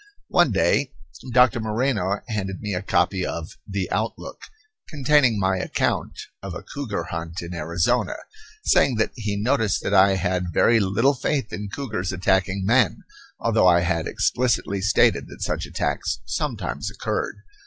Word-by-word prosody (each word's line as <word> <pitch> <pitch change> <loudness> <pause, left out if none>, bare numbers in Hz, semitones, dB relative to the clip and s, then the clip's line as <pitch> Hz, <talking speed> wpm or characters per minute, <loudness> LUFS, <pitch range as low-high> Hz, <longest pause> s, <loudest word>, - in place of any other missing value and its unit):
One - - +4
day - - +1 0.4
Doctor 125 -1 +4
Moreno 110 -3 0
handed 95 -5 -3
me 105 -2 -4
a 90 - -2
copy 95 -1 +1
of 85 -2 -4 0.2
The 95 -2 -2
Outlook - - -3 0.5
containing 140 - +3
my 95 -1 +1
account 90 - -1 0.2
of - - -6
a - - -7
cougar 110 -11 -4
hunt 85 +1 -5
in 85 +1 -7
Arizona, 85 0 0 0.5
saying 130 - +3
that 110 - 0
he 105 -3 -3
noticed 110 -2 +1
that 100 - -1
I 95 0 +6
had 90 -1 -1
very 115 +7 +4
little 110 +8 +2
faith 130 -4 -2
in 100 +3 -5
cougars 110 -7 -3
attacking 95 +1 0
men, 120 +5 +2 0.4
although 110 -5 +3
I 85 -1 +5
had 85 -1 0
explicitly 115 -5 0
stated 105 +4 +3
that - - -8
such - - -2
attacks - - -2
sometimes - - -3
occurred. - - -3
100 Hz, 150 wpm, -23 LUFS, 90-115 Hz, 0.5 s, I